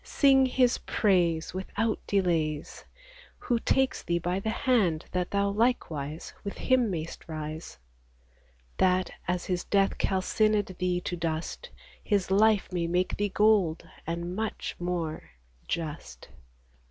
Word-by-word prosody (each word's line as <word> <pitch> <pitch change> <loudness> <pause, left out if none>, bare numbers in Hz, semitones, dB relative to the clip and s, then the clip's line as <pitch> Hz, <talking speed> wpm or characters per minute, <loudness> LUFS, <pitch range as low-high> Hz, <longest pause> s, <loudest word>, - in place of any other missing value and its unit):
Sing 270 -2 +4
His 250 -1 +2
praise 175 -6 +1
Without 205 +4 -1
delays, 165 -6 0 0.5
Who 240 -1 0
takes 265 +2 +1
thee 170 - 0
by 175 +2 -1
the 220 - -2
hand, 220 - +1
that 180 -1 -1
thou 200 0 +1
likewise 165 - -1
With 200 - -5
Him 255 -3 +2
mayst 165 -3 -5
rise; 155 0 -6 1.0
That, 185 -1 +2 0.2
as 180 0 -1
His 180 -1 -1
death 195 -1 +1
calcined 205 +1 +1
thee 180 -1 0
to 175 - -3
dust 165 -1 -3 0.3
His 200 -3 0
life 210 0 +4
may 170 -2 0
make 180 +2 0
thee 205 0 0
gold, 200 -6 +2 0.2
and, 170 +2 -3
much 220 +1 -3
more, 175 -3 -3 0.4
just. 165 -2 -5
185 Hz, 130 wpm, -28 LUFS, 170-210 Hz, 1.0 s, Sing